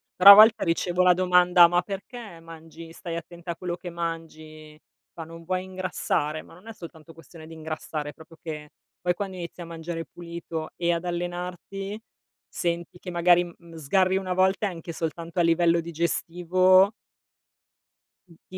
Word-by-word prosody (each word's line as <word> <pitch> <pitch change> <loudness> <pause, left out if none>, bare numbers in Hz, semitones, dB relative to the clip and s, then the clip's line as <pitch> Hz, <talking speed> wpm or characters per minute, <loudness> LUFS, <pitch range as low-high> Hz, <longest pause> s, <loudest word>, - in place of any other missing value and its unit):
Però 195 +2 +10
a - - +14
volte 215 +2 +7
ricevo 175 +2 +1
la 180 - +6
domanda: 180 -1 +5
"Ma 175 +1 +1
perché 200 -1 -8
mangi 165 0 -12
stai 170 -1 -6
attenta 170 +1 -7
a - - -5
quello 175 0 -4
che 175 0 -8
mangi?" 155 -2 -7 0.3
Fa: 165 - -7
"Non 165 +1 -12
vuoi 185 +2 -2
ingrassare?" 180 -5 -2
Ma - - -17
non 185 +6 -17
è 225 - -7
soltanto 165 -3 -12
questione 165 0 -14
di 165 - -11
ingrassare, 155 -1 -6
proprio 160 +1 -16
che, 150 -2 -7 0.3
poi 180 - +1
quando 190 +1 -5
inizi 170 0 -8
a 170 - -6
mangiare 165 0 -6
pulito 170 -2 -7
e 170 0 0
ad 170 +1 -3
allenarti, 180 +4 -5 0.5
senti 170 0 -3
che 180 0 -8
magari 175 0 +4
m 175 - -10 0.2
n - - -10
sgarri 185 +5 +2
1 185 -1 -2
volta, 190 +3 +2
e - - -2
anche 170 -1 -8
soltanto 165 +1 -4
a 175 - +4
livello 170 0 +3
digestivo 175 +3 +2 1.4
ti 175 +2 -13
170 Hz, 170 wpm, -25 LUFS, 165-180 Hz, 1.4 s, a